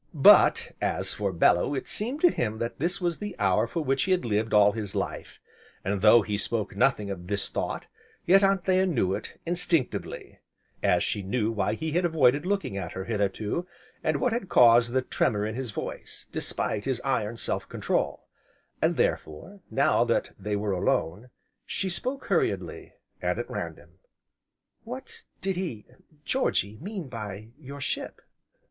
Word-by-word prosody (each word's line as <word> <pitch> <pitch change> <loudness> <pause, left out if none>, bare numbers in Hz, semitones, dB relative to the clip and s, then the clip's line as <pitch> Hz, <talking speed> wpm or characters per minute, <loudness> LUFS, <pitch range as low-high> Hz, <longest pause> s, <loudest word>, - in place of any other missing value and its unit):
But, - - +6
as - - 0
for 100 -2 -1
Bellew 90 +8 +3
it - - -4
seemed 250 +8 -2
to 350 - +6
him 110 -2 -2
that 115 +1 -4
this 175 +6 0
was 175 -3 -1
the 205 -1 -5
hour 100 +2 +2
for 165 +6 -3
which 135 -1 +1
he 190 - -1
had 180 - 0
lived 110 0 0
all 105 -1 +6
his 105 -2 -5
life, - - -4 0.5
and, 100 0 -1
though 110 +2 +7
he 100 0 -2
spoke 105 -1 -2
nothing 105 -2 +2
of 90 -2 -7
this 100 0 -1
thought, - - -3 0.4
yet 195 +3 +6
Anthea 190 -1 +3
knew 115 - +1
it, - - -6
instinctively, 170 -5 -1 0.4
as - - +3
she 105 - -1
knew 110 +3 -1
why 105 -1 0
he 160 +7 -3
had 175 +4 +1
avoided 150 -2 +3
looking 195 - -1
at 90 -3 -5
her 95 - -4
hitherto, 105 - -1 0.4
and 155 -2 +1
what 250 - +1
had 230 -6 -3
caused 120 -1 +6
the 130 0 +2
tremor 105 -4 0
in 110 - -3
his 130 +1 -4
voice, - - -6
despite 105 -1 -2
his 130 -3 -1
iron 115 -4 0
self - - -3
control; - - -1 0.6
and, - - +2
therefore, 180 - -2
now - - +3
that - - 0
they 105 +1 -2
were 100 0 -1
alone, 90 +4 -1 0.3
she 190 - -2
spoke 255 +9 -3
hurriedly, - - -1 0.3
and - - 0
at - - -3
random: - - -7 0.8
"What 265 - -9 0.2
did 190 -1 -1
he 155 - -4 0.4
Georgy 110 - 0
mean 195 -3 -5
by 110 -3 -7
your 140 -1 -9
ship?" 130 - -4
120 Hz, 165 wpm, -27 LUFS, -, 0.8 s, though